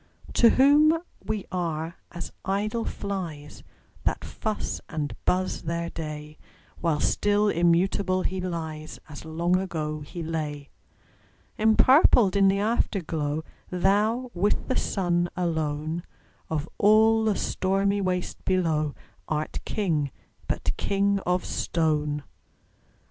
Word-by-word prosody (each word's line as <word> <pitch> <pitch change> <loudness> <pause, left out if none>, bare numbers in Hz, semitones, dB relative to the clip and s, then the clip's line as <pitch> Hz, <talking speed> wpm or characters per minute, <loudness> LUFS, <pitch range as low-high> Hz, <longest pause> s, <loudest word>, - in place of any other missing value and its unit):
To 235 - +6
whom 295 +6 +5 0.3
we 215 -2 -3
are 165 -2 -2 0.2
as 175 0 -6
idle 210 +4 -1
flies, 170 -8 -5 0.4
That - - -1
fuss 215 -1 -3
and 150 -3 -3
buzz 185 +1 +1
their 170 +1 -3
day; 150 -1 -7 0.4
While 160 -3 +1
still 205 +5 +2
immutable 185 +2 +2
he 185 0 -2
lies, 160 -3 -5
As 155 +1 -9
long 170 +3 +1
ago 155 -5 -3
he 165 +4 -7
lay. 150 -3 -4 0.9
Empurpled 220 - +5
in 195 -1 +5
the 195 +1 +3
Afterglow, 165 -8 -1 0.3
Thou, 210 +7 +1
with 195 +4 0
the 260 - 0
Sun 175 -3 0
alone, 160 -1 -1 0.5
Of 155 -1 -2
all 220 +2 +5
the 215 -2 +2
stormy 195 +2 0
waste 180 -1 -2
below, 160 -6 +1 0.3
Art 155 0 -2
King, 160 -9 0 0.4
but - - -1
king 200 0 +1
of 180 0 +1
stone! 150 -3 0
180 Hz, 115 wpm, -26 LUFS, 155-200 Hz, 0.9 s, To